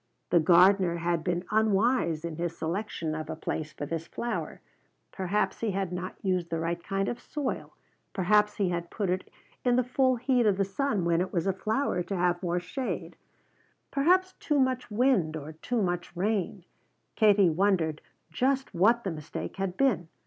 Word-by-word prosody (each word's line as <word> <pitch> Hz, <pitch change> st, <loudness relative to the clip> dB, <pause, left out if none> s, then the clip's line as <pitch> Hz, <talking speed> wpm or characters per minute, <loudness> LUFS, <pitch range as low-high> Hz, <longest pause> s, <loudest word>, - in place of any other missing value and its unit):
The 170 Hz, -, +6 dB
gardener 180 Hz, +2 st, +5 dB
had 170 Hz, -1 st, -1 dB
been 175 Hz, 0 st, -1 dB
unwise 215 Hz, -5 st, +2 dB
in 165 Hz, -2 st, -5 dB
his 170 Hz, -1 st, -3 dB
selection 165 Hz, -2 st, -3 dB
of 155 Hz, 0 st, -5 dB
a 160 Hz, -, -3 dB
place 155 Hz, -1 st, -4 dB
for 145 Hz, -, -6 dB
this 165 Hz, +2 st, -4 dB
flower; 240 Hz, -, -4 dB, 0.5 s
perhaps 190 Hz, +1 st, -1 dB
he 230 Hz, -, -1 dB
had 190 Hz, -2 st, -2 dB
not 180 Hz, +2 st, -4 dB
used 185 Hz, -3 st, 0 dB
the 165 Hz, -, -2 dB
right 170 Hz, +1 st, -2 dB
kind 195 Hz, 0 st, -1 dB
of 240 Hz, -, -3 dB
soil, 290 Hz, -4 st, -4 dB, 0.4 s
perhaps 210 Hz, +2 st, +3 dB
he 195 Hz, -3 st, +1 dB
had 170 Hz, -1 st, -3 dB
put 200 Hz, -5 st, -2 dB
it 185 Hz, +1 st, -2 dB, 0.3 s
in 245 Hz, -1 st, +3 dB
the 255 Hz, -, +3 dB
full 255 Hz, +1 st, +2 dB
heat 245 Hz, -1 st, +2 dB
of 200 Hz, -2 st, +3 dB
the 195 Hz, -, +2 dB
sun 205 Hz, -2 st, -1 dB
when 170 Hz, 0 st, +2 dB
it 185 Hz, -, -2 dB
was 170 Hz, -2 st, -1 dB
a 195 Hz, -, +2 dB
flower 215 Hz, 0 st, -1 dB
to 195 Hz, +3 st, -4 dB
have 175 Hz, 0 st, +1 dB
more 175 Hz, -1 st, 0 dB
shade; 255 Hz, +9 st, -4 dB, 0.8 s
perhaps 370 Hz, +6 st, +3 dB
too 295 Hz, -2 st, +1 dB
much 260 Hz, -2 st, 0 dB
wind 210 Hz, -9 st, +2 dB
or 150 Hz, +1 st, -7 dB
too 220 Hz, +8 st, -2 dB
much 175 Hz, -1 st, -3 dB
rain 195 Hz, -2 st, -1 dB, 0.5 s
Katie 205 Hz, -5 st, +5 dB
wondered 165 Hz, -3 st, +1 dB, 0.3 s
just 265 Hz, +9 st, 0 dB
what 225 Hz, +7 st, +3 dB
the 190 Hz, -, -2 dB
mistake 155 Hz, +3 st, -6 dB
had 190 Hz, -2 st, -3 dB
been. 245 Hz, -11 st, +2 dB
190 Hz, 180 wpm, -28 LUFS, 170-225 Hz, 0.8 s, The